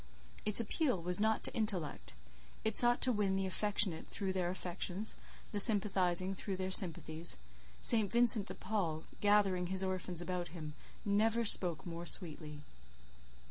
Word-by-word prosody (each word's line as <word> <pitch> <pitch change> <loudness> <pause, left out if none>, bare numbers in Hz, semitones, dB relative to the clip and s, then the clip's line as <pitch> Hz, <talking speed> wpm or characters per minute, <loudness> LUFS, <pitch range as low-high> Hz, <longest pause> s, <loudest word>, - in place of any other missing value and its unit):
Its 210 +1 +4
appeal 245 - -1
was 180 +2 +2
not 220 +1 0
to - - 0
intellect; 195 - -4 0.5
it 220 -1 0
sought 240 0 +6
to 255 - +4
win 205 -4 -1
the 195 0 -1
affectionate 190 -2 0
through 190 -2 -4
their 180 -2 -2
affections, 185 +3 -2 0.4
the 205 - -3
sympathizing 195 -3 +2
through 195 0 -5
their 185 0 -4
sympathies: 165 - +2 0.5
St. 215 -4 +2
Vincent 235 -3 +3
de - - -4
Paul, 170 -7 -3 0.2
gathering 200 -3 +2
his 190 +1 +1
orphans 185 -2 -4
about 175 0 -4
him, 155 -3 -9 0.3
never 220 +3 +1
spoke 175 -7 +3
more 170 0 -7
sweetly. 155 -4 -4
190 Hz, 145 wpm, -34 LUFS, 175-210 Hz, 0.5 s, sought